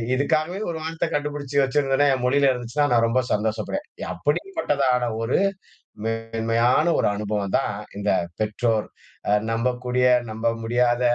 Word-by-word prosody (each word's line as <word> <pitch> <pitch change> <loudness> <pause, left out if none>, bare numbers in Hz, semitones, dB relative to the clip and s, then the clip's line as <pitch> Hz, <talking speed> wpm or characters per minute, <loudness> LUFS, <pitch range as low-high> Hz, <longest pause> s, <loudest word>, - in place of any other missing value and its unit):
இதுக்காகவே 155 +6 0
ஒரு 160 - -5
வார்த்த 160 0 -2
கண்டபிடிச்சு 145 -1 -3
வச்சிருந்துதுனா? 135 +1 +2
என் 125 - -5
மொழியில 140 +1 +4
இருந்துச்சுனா? 125 +4 -1
நான் 115 -1 +4
ரொம்ப 130 +3 +2
சந்தோஷப்படுவேன். 110 - -2 0.3
அப்படிப்பட்டதான 140 - 0
ஒரு 115 +9 +1 0.7
மேன்மையான 115 +4 +1
ஒரு - - +2
அனுபவம் 105 -1 -2
தான், 105 - -2 0.2
இந்த 100 0 -1 0.3
பெற்றோர். 110 +1 0 0.6
நம்பக்கூடிய, 125 +2 0 0.3
நம்ப 110 +1 -2 0.2
முடியாத, 120 +1 +2
125 Hz, 120 wpm, -23 LUFS, 115-145 Hz, 0.7 s, மொழியில